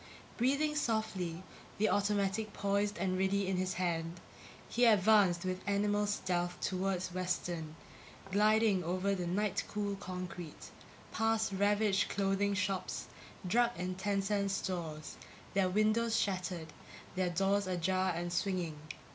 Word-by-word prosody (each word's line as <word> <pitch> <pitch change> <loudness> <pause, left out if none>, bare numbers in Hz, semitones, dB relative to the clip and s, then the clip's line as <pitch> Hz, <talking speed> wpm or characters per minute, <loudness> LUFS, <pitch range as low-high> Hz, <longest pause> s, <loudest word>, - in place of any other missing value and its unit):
Breathing 280 +5 +1
softly, 190 - -1 0.3
the 215 - +3
automatic 205 +1 0
poised 200 +1 0
and 185 +1 0
ready 195 +1 +2
in 190 -1 0
his 185 0 -1
hand, 170 -1 -2 0.5
he 245 +1 +2
advanced 200 -5 +5
with 185 0 -2
animal 205 +1 +2
stealth 175 -3 -1
toward 190 -1 -1
Western, 175 -3 -2 0.6
gliding 210 -1 +4
over 185 +4 0
the 180 -3 -2
night 200 +2 0
cool 205 -1 -2
concrete, 180 -3 -7 0.4
past 225 -1 +1
ravaged 205 0 +2
clothing 200 0 +1
shops, 195 -1 -2 0.4
drug 235 +6 +3
and 180 +1 -3
ten 200 0 0
cent 200 0 0
stores, 170 -5 -4 0.4
their 195 -2 +3
windows 215 +3 +2
shattered, 180 -5 -2 0.4
their 185 -1 0
doors 195 +3 +1
ajar 185 +1 +1
and 175 +1 -3
swinging. 175 -4 -1
195 Hz, 125 wpm, -34 LUFS, 180-205 Hz, 0.6 s, advanced